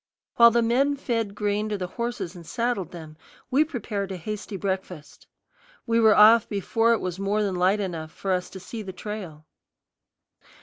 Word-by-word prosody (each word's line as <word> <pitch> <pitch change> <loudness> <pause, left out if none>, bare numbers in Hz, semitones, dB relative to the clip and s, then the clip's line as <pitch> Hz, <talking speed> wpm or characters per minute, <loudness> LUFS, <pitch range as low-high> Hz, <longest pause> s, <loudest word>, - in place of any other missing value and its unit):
While 235 0 +9
the 235 0 +2
men 270 +5 +2
fed 230 -7 -2
grain 210 +1 -1
to 210 - -2
the 185 - -3
horses 235 -3 -4
and 175 - -10
saddled 230 -2 -2
them, 160 -3 -11 0.3
we 280 +4 +5
prepared 220 -10 -4
a 190 - -4
hasty 210 +3 -6
breakfast. 190 -5 -5 0.6
We 230 0 +2
were 220 -2 +6
off 220 +1 +7
before 225 +3 +1
it 230 - 0
was 185 0 -4
more 205 +2 0
than 200 -2 -1
light 185 +3 +2
enough 165 -5 -4
for 195 - -4
us 180 -1 -1
to 190 - -9
see 220 +5 -7
the 190 -3 -7
trail. 180 -5 -7
205 Hz, 180 wpm, -25 LUFS, 185-230 Hz, 0.6 s, While